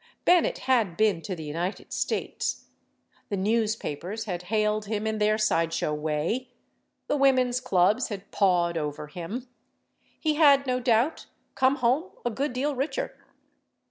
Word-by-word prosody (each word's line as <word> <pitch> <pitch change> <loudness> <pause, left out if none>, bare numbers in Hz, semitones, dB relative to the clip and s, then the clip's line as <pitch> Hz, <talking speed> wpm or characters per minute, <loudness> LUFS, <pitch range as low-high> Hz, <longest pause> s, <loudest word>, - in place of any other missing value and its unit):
Bennett 355 -1 +4
had 225 -10 +2
been 210 -6 +2
to 185 +1 -4
the 160 - -7
United 170 +6 -4
States; - - -2 0.6
the 200 - -1
newspapers 215 -2 -1
had 180 -4 -3
hailed 215 -1 +1
him 215 0 -2
in 220 0 -1
their 210 +1 +3
side 165 -6 +1
show 150 - -1
way; 155 +12 -2 0.6
the - - 0
women's 255 -3 +3
clubs 210 +1 +2
had 200 -3 -7
pawed 175 -4 +2
over 150 0 -4
him; 180 - -6 0.7
he 310 -1 +1
had, 285 -3 +5
no 255 -1 0
doubt, 245 +4 +1 0.3
come 260 +1 +3
home 265 +8 +1 0.2
a 240 - +1
good 275 +5 -2
deal 275 +3 -1
richer. 320 - -2
220 Hz, 145 wpm, -27 LUFS, 180-255 Hz, 0.7 s, had